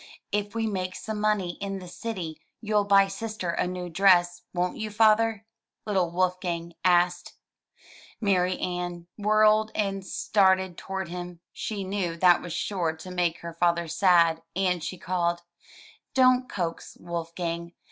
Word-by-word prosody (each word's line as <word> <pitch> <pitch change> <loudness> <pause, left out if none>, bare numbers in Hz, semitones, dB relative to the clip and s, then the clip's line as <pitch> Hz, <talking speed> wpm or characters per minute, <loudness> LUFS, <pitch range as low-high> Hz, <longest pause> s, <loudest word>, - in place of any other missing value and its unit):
If 205 +1 -2
we 225 -1 0
make 185 -3 -2
some 215 -1 -5
money 205 -5 0
in 195 -1 -3
the 185 -1 -9
city 180 -3 -6 0.2
you'll 210 -2 +1
buy 200 -1 +5
sister 195 -2 -4
a 175 - -1
new 180 0 -4
dress, 175 0 +4
won't 180 0 -1
you. 215 -1 -3
Father?'* 220 0 +3 0.4
little 190 -5 +1
Wolfgang 175 -1 -1
asked. 175 0 +2 0.9
Marianne 180 -3 -1
whirled 215 +1 +4
and 195 -2 -1
started 190 -2 +2
toward 190 -1 -5
him. 175 -1 -7
She 205 -3 -4
knew 185 -3 -2
that 175 0 +5
was 175 - -7
sure 170 -2 -1
to 170 +3 -10
make 175 -2 0
her 170 0 -7
father 170 0 +1
sad, 170 -1 +4
and 180 -3 0
she 185 - -4
called, 175 -1 -1 0.7
"Don't 255 -1 +4
coax, 170 -4 -4
Wolfgang. 170 0 -4
185 Hz, 140 wpm, -27 LUFS, 175-205 Hz, 0.9 s, buy